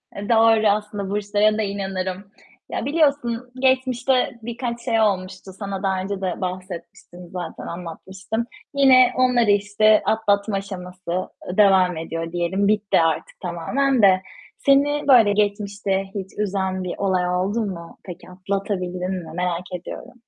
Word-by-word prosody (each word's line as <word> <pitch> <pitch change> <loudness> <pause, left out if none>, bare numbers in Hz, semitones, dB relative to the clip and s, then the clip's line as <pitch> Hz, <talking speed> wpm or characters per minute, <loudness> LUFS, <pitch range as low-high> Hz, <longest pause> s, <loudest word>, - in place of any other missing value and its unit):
E, 200 0 -6
doğru 225 -1 +5
aslında, 205 -1 -1
burçlara 210 +1 +1
da - - 0
inanırım. 190 -1 -3 0.5
Ya, - - -3
biliyorsun 280 -5 0
geçmişte 255 -1 +1
birkaç 235 +1 -4
şey 230 -2 +1
olmuştu. 190 -2 -1
Sana 200 -2 -5
daha 190 -1 0
önce 195 0 -4
de 185 -2 -3
bahsetmiştim 180 -1 -7
zaten, 180 -1 -6
anlatmıştım. 190 +6 -5 0.3
Yine 260 -3 +6
onları 250 -4 +3
işte 210 +1 +3
atlatma 210 -1 +1
aşaması, 185 -2 -7
ııı, 180 0 -5
devam 190 -4 +5
ediyor 165 +1 -4
diyelim, 175 +3 0
bitti 210 -2 +2
artık 165 -1 -1
tamamen 225 +10 0
de. 190 -2 +5 0.4
Seni, 285 +1 +2
böyle, 230 -7 +6
geçmişte 200 -1 0
hiç 195 -1 -5
üzen 190 -2 -1
bir 180 - -4
olay 185 -2 0
oldu 195 +5 0
mu? 170 -4 -7
Peki 180 -1 -10
atlatabildin 185 -1 -3
mi, 160 - -10
merak 180 0 -2
ediyorum? 180 - -8
200 Hz, 135 wpm, -22 LUFS, 185-225 Hz, 0.5 s, Yine